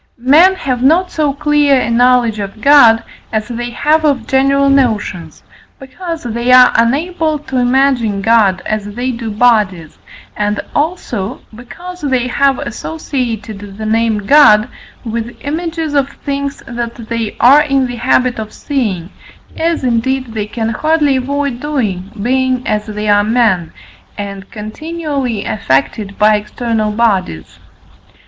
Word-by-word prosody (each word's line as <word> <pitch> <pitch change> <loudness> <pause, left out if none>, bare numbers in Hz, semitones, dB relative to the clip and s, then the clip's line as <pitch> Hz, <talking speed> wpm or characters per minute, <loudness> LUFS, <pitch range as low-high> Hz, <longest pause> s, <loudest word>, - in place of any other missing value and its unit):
Men 305 +10 +5
have 255 -8 -3
not 335 +8 +3
so 300 -3 0
clear 290 -1 +2
a 235 - -2
knowledge 240 -2 +3
of 200 +1 -6
God 235 -3 +6 0.3
as 215 -1 -2
they 240 0 -4
have 300 +6 +1
of 275 -7 +1
general 275 +1 +2
notions, 215 - 0 0.3
because 330 +5 -7
they 235 +1 -1
are 255 0 +7
unable 310 +7 +1
to 265 -3 -5
imagine 245 -4 +1
God 200 -3 +2
as 205 -1 -4
they 250 +2 -2
do 230 -2 -5
bodies, 210 -7 +1 0.4
and 210 0 -1
also 260 - -3
because 350 +11 -10
they 260 -4 0
have 275 +1 +1
associated 235 -7 -4 0.2
the 215 - -5
name 220 -1 0
God 240 -4 +5 0.4
with 230 +1 -5
images 320 +1 -3
of 280 -1 +1
things 280 0 -5
that 235 0 -5
they 230 -1 -4
are 275 +5 +6
in 275 -3 +1
the 245 -1 -5
habit 250 0 +1
of 215 -1 -6
seeing, 205 - -3 0.4
as 330 -2 -1
indeed 255 0 -1
they 210 -2 -3
can 225 +1 -3
hardly 300 +3 +1
avoid 280 -1 -2
doing, 220 -11 -3
being, 255 +2 0
as 210 0 -1
they 210 0 -4
are, 205 0 +4
men, 215 -7 +1 0.5
and 200 -1 -7
continually 270 0 -4
affected 200 +2 -1
by 215 0 +4
external 215 0 -2
bodies. 200 - -1
245 Hz, 140 wpm, -14 LUFS, 215-280 Hz, 0.5 s, are